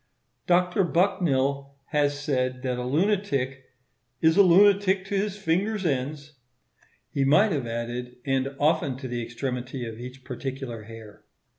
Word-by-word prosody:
Dr. 180 +2 +3
Bucknill 140 -7 +1
has 145 -2 +1
said 130 -3 -1
that 125 -1 -1
a - - -3
lunatic 140 -4 0 0.5
"is 160 0 +4
a 200 - +7
lunatic 195 +1 +5
to 200 +1 -3
his 200 0 -1
finger's 195 +2 0
ends;" 145 0 -3 0.7
he 140 - 0
might 155 +10 +4
have 140 -7 -1
added, 120 +2 -4
and 135 0 0
often 145 -3 +1
to 130 0 -6
the 120 -1 -3
extremity 125 +1 -4
of 115 0 -7
each 125 +2 -9
particular 130 -2 -5
hair. 110 -2 -12
140 Hz, 140 wpm, -26 LUFS, 125-175 Hz, 0.7 s, a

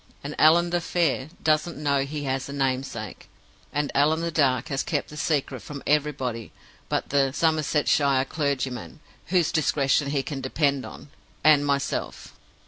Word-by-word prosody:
"And 145 +1 -5
Allan 170 +3 +5
the 175 0 +1
Fair 160 -5 0
doesn't 155 +1 +1
know 140 -1 +1
he 145 +1 -5
has 135 0 -2
a - - -6
namesake. 130 -6 -3 0.4
And 145 0 -1
Allan 155 +3 +3
the 170 0 -2
Dark 130 -6 +1
has 135 -2 -1
kept 145 -4 -2
the - - -9
secret 145 -4 -1
from 145 -2 -8
everybody 140 -6 -1 0.4
but - - -1
the 135 -1 +2
Somersetshire 145 -3 +2
clergyman 130 - -3 0.3
(whose 175 -2 +2
discretion 145 -2 +1
he 140 -1 0
can 140 -2 -5
depend 140 0 0
on) - - -12 0.3
and 150 -2 +6
myself. 140 -1 -2
145 Hz, 150 wpm, -25 LUFS, 135-155 Hz, 0.4 s, and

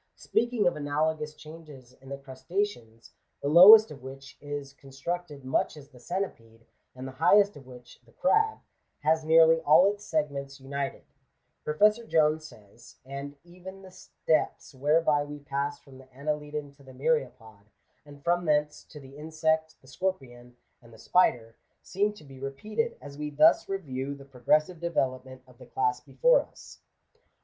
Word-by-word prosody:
Speaking 235 -3 0
of 175 - +2
analogous 150 +1 -2
changes 150 -5 -13
in 135 - -14
the 140 - -5
crustaceans, 135 - -5 0.3
the - - -4
lowest 200 +7 +9
of 140 - -11
which 135 +1 -11
is 145 -1 -6
constructed 140 +2 -6
much 130 +3 -1
as 145 -1 -13
the 130 -4 -17
centipede, 115 - -6 0.3
and 130 +1 -7
the - - -7
highest 205 +3 +5
of 135 -3 -14
which 125 -1 -14
(the 115 - -24
crab) 435 - +1 0.4
has 160 +2 +2
nearly 165 +1 +5
all 155 +5 +6
its 205 +1 -1
segments 140 -5 -3
united, 140 +1 -5 0.6
Professor 210 +9 +2
Jones 155 -5 +1
says 105 -1 -17
— - - -45
"And 140 +1 -8
even 185 +2 -12
the 190 - -13
steps 160 -4 -2
whereby 150 +2 +2
we 145 0 -8
pass 140 0 -3
from 135 -2 -16
the 130 0 -18
Annelidan 150 +1 -4
to 140 - -19
the 130 -1 -14
Myriapod, 125 -8 -2 0.4
and 145 -1 -15
from 175 +1 +1
thence 150 -1 0
to 150 - -13
the 135 -1 -14
Insect, 160 +1 -1
the 130 - -21
Scorpion, 130 -7 -5 0.2
and 120 -1 -18
the 110 - -15
Spider, 115 -5 +1 0.3
seem 205 +3 0
to 210 - -16
be 135 -2 -14
repeated 215 - -4
as 145 0 -10
we 150 0 -3
thus 150 +9 +4
review 140 -8 -4
the 140 -1 -14
pro 130 -3 -17
gressive 155 +7 +2
development 130 -6 -3
of 125 -2 -21
the - - -13
class 125 -1 -1
before - - +3
us." - - -15
145 Hz, 165 wpm, -28 LUFS, 135-165 Hz, 0.6 s, lowest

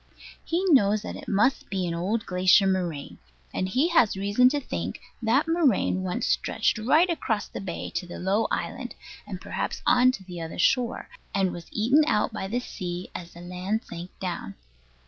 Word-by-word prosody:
He 345 +3 -1
knows 215 - +4
that - - -5
it - - -10
must 215 +7 +2
be 190 -2 -1
an 170 - -2
old 200 +7 -1
glacier 185 +2 +4
moraine; 175 -7 -2 0.3
and 185 - -1
he 270 - +2
has 245 - +4
reason 205 +6 +4
to 290 +2 0
think 90 - -4 0.2
that 240 +7 +2
moraine 295 - +2
once 185 -1 -2
stretched - - +1
right 300 +11 +4
across 230 - -1
the - - -7
bay 195 - -5
to 180 - -3
the 175 - -7
low 195 +4 +1
island, - - -3 0.3
and - - -6
perhaps - - -4
on 250 +1 +5
to 195 - -7
the 175 -2 -8
other 160 0 -6
shore, 245 +6 +1 0.3
and 190 -2 +2
was 170 -1 -8
eaten 260 +8 +4
out 215 -2 +1
by 195 -3 -3
the 235 +5 -1
sea 180 -6 -6
as 175 -1 -8
the 170 - -10
land 180 +5 -2
sank 175 +2 -7
down. 175 - -4
200 Hz, 185 wpm, -26 LUFS, 180-245 Hz, 0.3 s, on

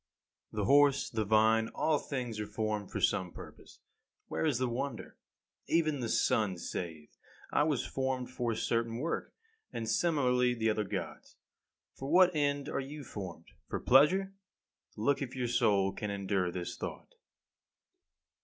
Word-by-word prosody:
19. - - -11
The 100 - +1
horse, 140 +1 +4
the 110 -2 -1
vine 110 +1 +4
all 155 -2 +2
things 125 -6 -4
are 105 - -3
formed 110 -2 -2
for - - -4
some 90 -2 +1
purpose. - - -13 0.5
Where - - 0
is 140 -6 +1
the 130 +1 0
wonder? 125 0 -4 0.5
Even 155 -3 +2
the 120 -2 -2
sun 100 -5 +2
saith, 80 -3 -6 0.4
"I - - +4
was 145 -6 0
formed 130 -1 -2
for 120 -2 -1
a - - -4
certain 115 0 -1
work;" 160 +7 -3 0.4
and 115 -1 -4
similarly 125 -2 +2
the 110 -1 +1
other 105 0 -1
Gods. - - -6 0.6
For 135 - -7
what 180 0 +6
end 145 -1 0
are - - -2
you 145 +2 -6
formed? 95 -8 -8 0.2
For - - -2
pleasure? 185 +9 +4 0.6
Look 140 +8 +1
if 130 -2 -4
your 125 -2 -1
soul 100 -4 +2
can 105 +1 -5
endure 100 -2 0
this 90 -1 -5
thought. - - -7
120 Hz, 155 wpm, -32 LUFS, 105-140 Hz, 0.6 s, what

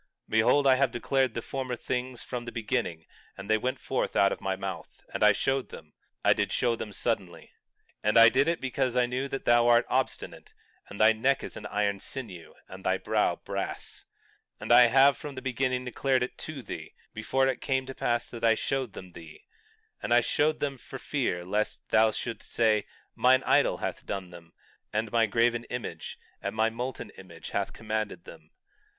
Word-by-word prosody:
20:3 - - -21
Behold, 110 +6 +4
I 130 -1 +6
have 135 -1 +3
declared 130 +1 0
the 115 - -3
former 130 -2 -4
things 125 0 -4
from 120 -1 -5
the 120 - -6
beginning; 110 -8 -2 0.3
and 95 - -8
they 110 +1 +3
went 130 +3 -2
forth - - -2
out 100 0 +4
of - - -4
my 95 -1 -1
mouth, 95 0 -7
and - - -3
I 105 - +8
showed 135 +6 -1
them. 75 -1 -12 0.3
I - - +7
did - - -1
show 120 -2 +1
them 110 -2 -6
suddenly. 100 -4 -3 0.5
20:4 105 - +2
And 105 - +3
I 115 0 +10
did 135 +5 +2
it 170 0 +1
because 130 -1 -1
I 125 -1 +4
knew 125 +3 -2
that 135 -1 -5
thou 120 0 +5
art 120 0 +5
obstinate, 130 0 -3 0.3
and 100 - -9
thy 110 +1 +6
neck 130 +5 +1
is - - -7
an 105 - -7
iron 100 -1 0
sinew, 100 -12 -8
and - - -11
thy - - +1
brow - - +1
brass; - - -6 0.5
20:5 - - -27
And - - -3
I 120 +1 +9
have 135 +4 +6
even - - -18
from 145 -2 -7
the 130 - -6
beginning 130 0 -1
declared 130 0 0
to 150 -5 -7
thee; - - -8 0.2
before 135 0 +1
it 135 - -1
came 130 -1 0
to 135 - -7
pass 120 -1 -1
I 115 -1 +2
showed 130 -2 -2
them 95 -1 -10
thee; 80 -3 -13 0.6
and - - -4
I 120 - +6
showed 150 +5 +1
them 140 -3 -2
for 135 - -9
fear 120 -11 -2
lest 105 +3 -2
thou 110 0 +5
shouldst 115 +2 -6
say—mine 115 +3 +2
idol - - +3
hath - - -4
done 95 -2 -4
them, 85 -1 -14 0.4
and 110 +1 -2
my 115 -1 +3
graven 120 +2 +2
image, 125 -1 -6 0.2
and - - -4
my 110 +1 +2
molten 125 +3 -5
image 85 -4 -10
hath - - -1
commanded 110 -4 -4
them. 80 -1 -13
120 Hz, 200 wpm, -28 LUFS, 105-130 Hz, 0.6 s, I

